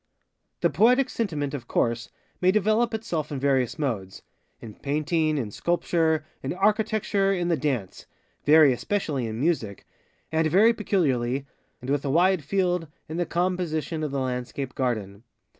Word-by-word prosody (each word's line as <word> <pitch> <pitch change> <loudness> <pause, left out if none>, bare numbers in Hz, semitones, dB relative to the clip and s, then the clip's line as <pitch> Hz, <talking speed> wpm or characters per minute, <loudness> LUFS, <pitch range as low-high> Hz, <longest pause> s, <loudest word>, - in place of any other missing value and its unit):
The - - +3
Poetic 250 +4 +4
Sentiment, 155 -11 -2
of 125 -5 -6
course, 115 -1 0 0.3
may 180 - +4
develop 215 +3 +2
itself 215 -10 -3
in 140 - -3
various 135 -3 +1
modesŌĆöin 110 - -7
Painting, 155 +2 0
in 115 -7 -3
Sculpture, 160 - 0 0.2
in 135 - -3
Architecture, 205 0 +1
in 175 -3 0
the 170 - +3
DanceŌĆövery 140 - +1
especially 145 - -2
in 110 +1 -5
MusicŌĆöand 155 - -3
very 210 +8 +5
peculiarly, 135 - 0 0.4
and 130 +2 -4
with 145 -1 0
a 140 - -2
wide 175 +3 +3
field, 180 0 0 0.2
in 160 - -5
the 175 - -1
com 180 +2 0
position 160 -3 -3
of 150 - -1
the 140 0 -2
Landscape 125 0 -3
Garden. 110 -6 -2
155 Hz, 140 wpm, -25 LUFS, 130-185 Hz, 0.4 s, very